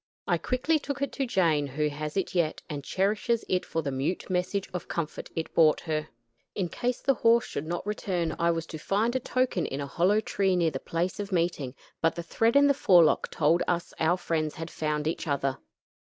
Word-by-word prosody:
I - - +2
quickly 300 +5 +1
took 280 -1 -4
it 280 - -2
to 270 -2 -2
Jane, 165 -9 +2
who 150 +3 -1
has 150 +3 -5
it 195 - -1
yet, 170 -4 0
and 145 -2 -5
cherishes 210 - 0
it 185 0 +1
for 165 - -3
the 140 - -2
mute 135 +9 -2
message 185 +2 -1
of 180 - -4
comfort 165 -3 -4
it 165 - -3
brought 155 -2 +5
her. 155 -2 -2 0.5
In 185 -4 -1
case 245 +4 -2
the 270 - +3
horse 235 -2 +4
should 145 +2 -5
not 175 +3 -3
return, 180 -6 -2
I 170 - +3
was 165 -1 0
to 155 - -5
find 220 +9 0
a - - +2
token 255 -7 0
in 135 - -4
a 140 - -2
hollow 180 +9 +2
tree 195 -3 +1
near 170 -2 +2
the 135 - -4
place 170 +7 -2
of 205 0 -4
meeting; 165 -7 -1 0.3
but 165 - +2
the 170 - -4
thread 225 +8 +1
in 285 0 +7
the 285 - +5
forelock 180 - +4
told 160 +3 +2
us 175 -1 -1
our 165 +3 +3
friends 160 -3 -1
had 165 0 -6
found 150 -1 -2
each 160 +1 -2
other. 140 -2 -1
170 Hz, 215 wpm, -28 LUFS, 155-205 Hz, 0.5 s, in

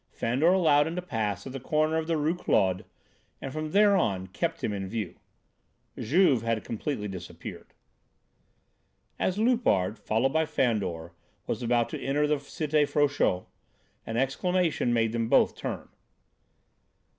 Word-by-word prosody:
Fandor 130 +8 0
allowed 155 -6 +4
him 165 - -4
to 180 - -2
pass 110 - -2
at 130 - -7
the 135 - -5
corner 155 +4 +1
of 160 0 -2
the 165 -1 +1
Rue 155 +2 +1
Claude, 95 - +1 0.5
and 135 - -6
from 155 0 -3
there 205 +3 +5
on 95 - 0
kept 165 - -3
him 105 - 0
in 95 -1 -4
view. 110 +2 -5 0.8
Juve 140 - +3
had 115 -1 -1
completely 115 -1 -3
disappeared. 90 -3 -8 1.5
As 185 - 0
Loupart, 215 - +2
followed 120 +6 0
by 160 0 +2
Fandor, 100 - -1 0.3
was - - -3
about 120 -1 +2
to - - -6
enter 145 +2 +1
the 150 0 +1
Cité 150 +1 0
Frochot, 145 -11 +1 0.6
an 115 - -3
exclamation 160 +2 +1
made 115 -1 +2
them 115 -1 -1
both - - +4
turn. - - -5
135 Hz, 145 wpm, -28 LUFS, 110-160 Hz, 1.5 s, there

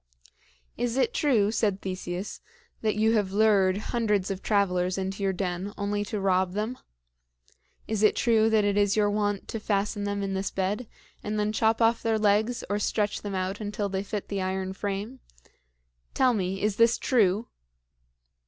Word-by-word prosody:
"Is 245 +1 -1
it 455 - +2
true," 235 - +2
said 215 -3 0
Theseus, 185 0 -5 0.4
"that 215 -1 0
you 220 +1 +3
have 205 -4 +1
lured 200 -3 +4 0.2
hundreds 210 -5 +1
of 190 0 -4
travelers 185 -3 +1
into 195 +1 -3
your 195 -1 +2
den 185 +1 -3
only 205 0 -1
to 210 +1 -3
rob 185 -1 +1
them? 215 +5 -3 1.1
Is 220 -2 -1
it 215 - +4
true 225 -2 +3
that 220 -1 +3
it 205 0 +1
is 205 -1 +3
your 205 -1 +2
wont 205 -1 -1
to 225 - -3
fasten 205 0 -1
them 200 0 -2
in 195 -1 -2
this 190 +1 -1
bed, 200 +5 -2 0.3
and 210 0 -3
then 210 0 0
chop 225 +1 +2
off 225 +1 +3
their 225 -1 +1
legs 215 +3 +2
or 205 0 -1
stretch 205 0 -1
them 200 -2 -4
out 185 +3 -2
until 205 -1 -3
they 190 0 -2
fit 205 0 -5
the 200 -1 -2
iron 190 0 -2
frame? 205 +6 -4 1.0
Tell 255 -2 +4
me, 190 -2 -2
is 210 -1 0
this 230 0 +4
true?" 220 -4 +2
205 Hz, 175 wpm, -27 LUFS, 195-220 Hz, 1.1 s, lured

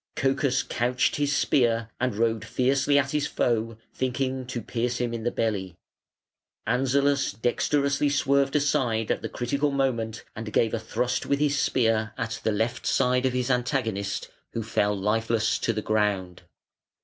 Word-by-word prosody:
Cocas 135 -1 +1
couched 125 +1 0
his 145 0 +1
spear 115 -5 +2
and 125 -3 0
rode 115 0 +1
fiercely 135 +5 +2
at 140 -1 +2
his 150 -1 0
foe, 115 -2 0 0.2
thinking 130 0 -2
to 125 -1 -3
pierce 120 +2 -2
him 120 -1 -2
in 115 - -3
the 120 - +1
belly. 100 -7 -2 0.9
Anzalas 140 +2 +2
dexterously 140 +6 +1
swerved 140 -1 +2
aside 120 -6 +1
at - - -1
the - - -4
critical 140 +4 -1
moment 120 -5 -1
and 110 0 -6
gave 110 +2 +2
a 115 - 0
thrust 125 +3 -2
with 140 - +2
his 145 -1 +1
spear 110 -3 +1
at 115 +1 -3
the 110 - +1
left 110 +3 -1
side 125 +1 +2
of 130 - -2
his 125 +1 0
antagonist, 120 -6 -1 0.2
who 115 - -2
fell 105 -2 0
lifeless 110 +2 +1
to - - 0
the 110 -1 -3
ground. 100 -4 0
120 Hz, 160 wpm, -26 LUFS, 110-135 Hz, 0.9 s, spear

